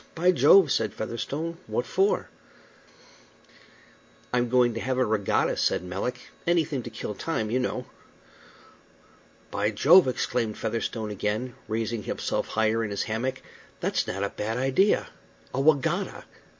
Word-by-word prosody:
By 180 +2 +4
Jove!" 180 -2 +6
said 110 -1 0
Featherstone. 145 +9 -4
"What 120 - -1
for?" 195 +3 +1 2.1
"I'm 120 -1 +1
going 125 -1 +3
to 115 - -4
have 130 +2 -1
a 130 - +3
regatta," 105 -2 +1
said - - +1
Melick. 100 +8 -5 0.2
"Anything 165 -5 +1
to 120 - -7
kill 110 -2 -5
time, 110 -2 -2
you 125 - +2
know." 125 - -2 1.7
"By 105 - 0
Jove!" 155 - +6
exclaimed 120 -3 -1
Featherstone 110 -1 -3
again, 105 +5 -2
raising 110 0 -2
himself - - -2
higher 110 +1 +1
in 110 - -3
his 100 - -2
hammock, 130 +4 -3 0.4
"that's - - 0
not 95 +1 -3
a 100 - 0
bad 110 +3 -3
idea. 135 +11 +2 0.4
A 135 - 0
wegatta! 145 -2 +1
120 Hz, 135 wpm, -26 LUFS, 110-135 Hz, 2.1 s, Jove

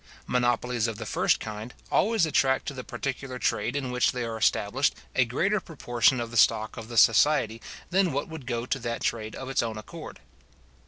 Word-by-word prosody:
Monopolies 120 -1 +1
of 110 -2 -4
the 115 - -6
first - - +2
kind 110 +2 -7 0.2
always 220 -4 +3
attract 135 -4 +2
to - - -4
the 130 -2 -7
particular 130 +2 -5
trade 125 - -1
in 135 -3 -2
which 125 0 +2
they 125 -1 -2
are 115 -1 -4
established 110 +4 +1 0.2
a 125 - +4
greater 190 - +1
proportion 125 -7 +1
of 115 -1 -4
the 120 - -3
stock 110 0 +3
of 115 -2 -8
the 120 0 -6
society 115 -1 +4 0.3
than 190 -1 +3
what 140 +1 -2
would 160 -6 -9
go 120 -2 -2
to 135 - -1
that 115 -1 -4
trade 110 -1 -2
of 130 - -7
its 135 - +1
own 115 -2 -3
accord. 110 - -9
125 Hz, 200 wpm, -27 LUFS, 115-135 Hz, 0.3 s, a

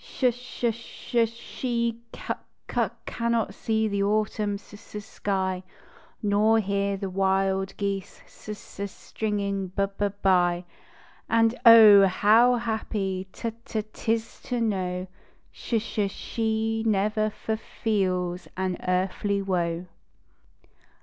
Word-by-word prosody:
Sh 255 -2 +1
sh 245 -1 -2
sh 235 +1 -1
she 235 0 -3
ciic - - -4 0.3
cuc - - 0
cannot 235 -1 -1
see 220 -1 0
the 200 -1 -1
Autumn 210 0 0
s 200 - -12 0.2
s 210 -1 -5
sky, 190 -3 -2 0.6
Nor 210 +2 +4
hear 200 -1 0
the 195 -1 -4
wild 190 0 +1
geese 200 -1 -3
s - - -15
s 210 -2 -9
s 200 -1 -3
stringing 200 -3 -3
b 195 +2 0
b 205 - +3 0.2
bv; 175 -2 +3 0.7
And, 225 0 +4
oh! 210 -4 +10
how 225 +6 +5
happy 210 -5 -2
t 230 - -4
t - - -23 0.3
t - - -30
tis 225 0 -2
to 245 -1 -2
know 185 -5 -1 0.5
Sh 235 - -4
sh 210 -2 -1
she 225 +1 -1
never 215 0 +1
f 215 0 -7
f 220 - 0
feels 185 -4 -1
an 185 -1 -1
earthly 195 +2 0
woe 175 -2 -1
205 Hz, 130 wpm, -26 LUFS, 190-225 Hz, 0.7 s, oh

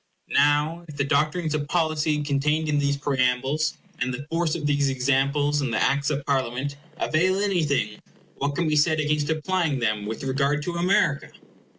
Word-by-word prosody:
Now 150 +4 +2
if 150 -2 -10
the 140 - +1
doctrines 155 +3 0
of 145 -1 -2
policy 155 -2 0
contained 150 +2 0
in 150 -1 +1
these 140 0 +1
preambles, 135 +2 0 0.2
and 125 - -1
the 130 +3 -6
force 165 -1 0
of 155 -3 -4
these 145 -1 +2
examples 140 +3 +1
in 135 - -1
the 115 - -1
Acts 140 +2 +1
of 145 -2 -2
Parliaments, 135 0 -1 0.2
avail 185 +5 +1
anything, 155 - 0 0.4
what 140 +1 -2
can 170 0 0
be 155 - +1
said 155 +1 +3
against 150 -1 0
applying 160 -1 0
them 110 -4 -1
with 110 +4 -5
regard 140 +2 0
to 175 - -3
America? 170 -5 +1
145 Hz, 175 wpm, -24 LUFS, 140-155 Hz, 0.4 s, said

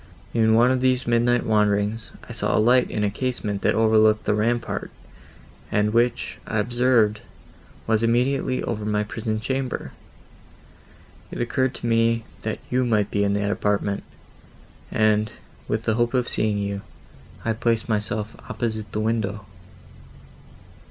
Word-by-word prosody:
In 110 -1 +4
one 120 +3 +5
of 130 -1 +1
these 130 0 +2
midnight 120 +1 +2
wanderings, 105 0 +1 0.2
I - - -9
saw - - 0
light 125 +3 +4
in 105 - -2
a 100 - +1
casement 110 -4 -3
that - - +2
overlooked 110 -1 +4
the - - +2
rampart, 115 +3 -1 0.8
and 105 +1 +1
which, 120 +1 0
I 110 - -2
observed, 115 -1 +2 0.6
was 110 -1 +2
immediately 125 +3 +1
over 105 -2 -3
my 105 0 0
prison 110 +1 -3
chamber. 130 +2 -3 1.4
It - - -7
occurred 125 +2 0
to - - -6
me, 115 0 +2 0.2
that 110 - -3
you 130 +1 +1
might 105 -4 +1
be 100 - +1
in 100 0 +1
that 100 0 0
apartment, 100 -1 0 0.9
and, 110 0 +2 0.4
with 110 +1 -1
the 110 - +1
hope 120 +3 +1
of 125 -1 +1
seeing 105 -1 +1
you, 100 0 -3 0.6
I 115 - +1
placed 115 0 0
myself 105 -1 -2
opposite 110 -3 -3
to - - -22
the 105 - -1
window." 110 -2 -1
110 Hz, 145 wpm, -24 LUFS, 105-120 Hz, 1.4 s, one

